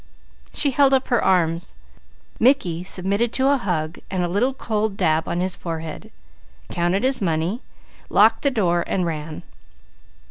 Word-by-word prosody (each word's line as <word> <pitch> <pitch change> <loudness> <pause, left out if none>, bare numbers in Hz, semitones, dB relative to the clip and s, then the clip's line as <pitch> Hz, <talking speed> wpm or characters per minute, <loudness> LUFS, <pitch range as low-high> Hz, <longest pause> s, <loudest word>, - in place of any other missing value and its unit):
She 285 - +2
held 275 0 +4
up 265 - -1
her 240 - +2
arms. 170 - +1 0.6
Mickey 215 -10 +2
submitted 200 +5 -1
to 265 +1 +3
a 285 - +3
hug 170 -8 -3
and 185 -2 -1
a - - 0
little 205 +9 +1
cold 215 -5 -2
dab 160 0 +1
on 175 - -1
his 185 0 -1
forehead, 160 -2 -6 0.6
counted 175 +4 0
his 265 -2 +1
money, 170 - -1 0.5
locked 220 +2 +4
the 280 - +2
door 175 -9 +1
and 185 -2 0
ran. 155 -1 -5
190 Hz, 150 wpm, -22 LUFS, 170-235 Hz, 0.6 s, held